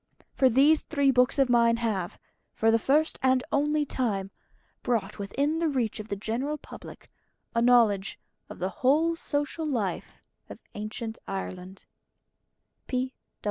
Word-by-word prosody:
For 260 Hz, -, +4 dB
these 285 Hz, +6 st, +5 dB
three 285 Hz, -3 st, +2 dB
books 250 Hz, +2 st, +3 dB
of 270 Hz, -1 st, +4 dB
mine 235 Hz, -1 st, +4 dB
have, 210 Hz, -7 st, -2 dB, 0.4 s
for 225 Hz, 0 st, +3 dB
the 230 Hz, -, +3 dB
first 300 Hz, +7 st, +1 dB
and 260 Hz, -1 st, +3 dB
only 295 Hz, +1 st, +1 dB
time, 200 Hz, -8 st, -2 dB, 0.5 s
brought 215 Hz, -4 st, -1 dB
within 280 Hz, +10 st, -1 dB
the 335 Hz, -1 st, +1 dB
reach 240 Hz, -6 st, -1 dB
of 215 Hz, -, -7 dB
the 200 Hz, -, -3 dB
general 240 Hz, +9 st, -3 dB
public -, -, -12 dB, 0.4 s
a 230 Hz, -, +1 dB
knowledge 230 Hz, -5 st, +3 dB, 0.3 s
of -, -, -9 dB
the 185 Hz, +1 st, -2 dB
whole 315 Hz, +6 st, +3 dB
social 305 Hz, 0 st, -2 dB
life 215 Hz, -, -3 dB, 0.3 s
of -, -, -9 dB, 0.2 s
Ancient 220 Hz, +2 st, -5 dB
Ireland. 190 Hz, -1 st, -6 dB
245 Hz, 140 wpm, -27 LUFS, 215-285 Hz, 0.5 s, these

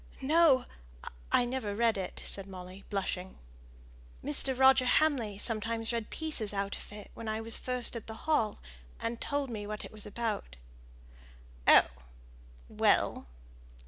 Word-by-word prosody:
"No! 295 Hz, -3 st, +5 dB, 0.7 s
I 245 Hz, -, +4 dB
never 240 Hz, -5 st, -3 dB
read 230 Hz, 0 st, +3 dB
it!" 190 Hz, -2 st, -5 dB
said 195 Hz, -1 st, -6 dB
Molly, 185 Hz, 0 st, -9 dB
blushing. 190 Hz, -2 st, -3 dB, 0.9 s
"Mr. 260 Hz, -, -1 dB
Roger 265 Hz, -1 st, +6 dB
Hamley 250 Hz, -9 st, +2 dB
sometimes 225 Hz, +1 st, -1 dB
read 230 Hz, -2 st, -2 dB
pieces 255 Hz, -11 st, -1 dB
out 200 Hz, 0 st, -1 dB
of -, -, -10 dB
it 210 Hz, -1 st, -10 dB
when 230 Hz, -, -8 dB
I 215 Hz, 0 st, -1 dB
was 225 Hz, 0 st, 0 dB
first 250 Hz, -1 st, -1 dB
at 230 Hz, -, -6 dB
the 220 Hz, -, -6 dB
Hall, 295 Hz, -9 st, +2 dB, 0.4 s
and 230 Hz, 0 st, -3 dB
told 285 Hz, -3 st, -1 dB
me 205 Hz, -2 st, -5 dB
what 215 Hz, 0 st, -5 dB
it -, -, -10 dB
was 215 Hz, -1 st, -7 dB
about." 210 Hz, -, -3 dB, 1.1 s
"Oh! -, -, +9 dB, 0.8 s
well. -, -, +2 dB
225 Hz, 145 wpm, -31 LUFS, 205-255 Hz, 1.1 s, Oh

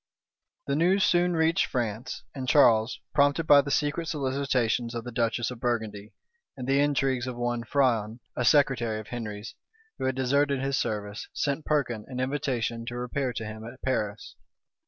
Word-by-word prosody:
The 140 Hz, -, 0 dB
news 185 Hz, +5 st, +3 dB
soon 175 Hz, -2 st, +3 dB
reached 160 Hz, 0 st, +2 dB
France; 120 Hz, -1 st, -3 dB
and 130 Hz, -2 st, -4 dB
Charles, 115 Hz, -5 st, +4 dB
prompted 145 Hz, +3 st, +3 dB
by 145 Hz, -2 st, +7 dB
the 140 Hz, -, -6 dB
secret 150 Hz, +3 st, 0 dB
solicitations 130 Hz, -5 st, 0 dB
of 115 Hz, -, -3 dB
the 125 Hz, -, -7 dB
duchess 120 Hz, +1 st, 0 dB
of 125 Hz, -, -8 dB
Burgundy, 110 Hz, -4 st, -3 dB, 0.4 s
and 125 Hz, -1 st, -5 dB
the 135 Hz, +1 st, +3 dB
intrigues 135 Hz, -3 st, +1 dB
of 125 Hz, -, -4 dB
one 120 Hz, -1 st, -1 dB
Frion, 115 Hz, -4 st, +1 dB, 0.2 s
a 125 Hz, -, -1 dB
secretary 120 Hz, -4 st, +3 dB
of 110 Hz, -, -10 dB
Henry's, 110 Hz, -3 st, -6 dB, 0.5 s
who -, -, -2 dB
had 130 Hz, -1 st, 0 dB
deserted 140 Hz, +2 st, +2 dB
his 135 Hz, +1 st, -1 dB
service, 105 Hz, -2 st, -3 dB
sent 145 Hz, +1 st, -1 dB
Perkin 120 Hz, -8 st, 0 dB
an 125 Hz, -1 st, -6 dB
invitation 130 Hz, -4 st, -1 dB
to 120 Hz, -, -4 dB
repair 125 Hz, +2 st, -2 dB
to 110 Hz, -2 st, -5 dB
him 110 Hz, +1 st, -7 dB
at 115 Hz, +3 st, -10 dB
Paris. 110 Hz, -5 st, -2 dB
125 Hz, 170 wpm, -27 LUFS, 115-140 Hz, 0.5 s, by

